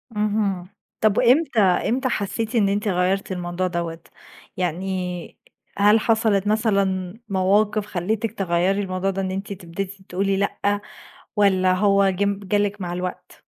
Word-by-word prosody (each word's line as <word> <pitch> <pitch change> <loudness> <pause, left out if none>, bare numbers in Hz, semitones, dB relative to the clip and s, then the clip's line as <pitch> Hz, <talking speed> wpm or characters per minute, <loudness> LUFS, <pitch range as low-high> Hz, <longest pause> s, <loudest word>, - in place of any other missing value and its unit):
اهم، 205 -4 0 0.3
طب 215 -2 +3
وامتى 255 -2 +4
امتى 230 +7 +2
حسيتِ 220 +2 -2
إن 200 -3 +3
أنتِ 205 +2 -1
غيرتِ 190 +1 0
الموضوع 180 0 -2
دوّة؟ 170 -2 -3 0.6
يعني 180 0 -3 0.4
هل 210 +2 +5
حصلت 220 -3 +2
مثلًا 200 -2 0
مواقف 205 +2 +2
خلتِك 210 +4 -2
تغيري 190 -1 0
الموضوع 185 0 -2
ده 195 0 -2
إن 190 -1 -2
أنتِ 195 +2 -4
تبتدي 190 +2 -7
تقولي 195 +2 0
لأ، 205 +1 0 0.5
ولا 190 -3 +3
هو 200 +1 +3
جم 200 +1 0
جالِك 205 +1 0
مع 175 -1 -3
الوقت؟ 180 +1 -6
195 Hz, 135 wpm, -23 LUFS, 185-210 Hz, 0.6 s, هل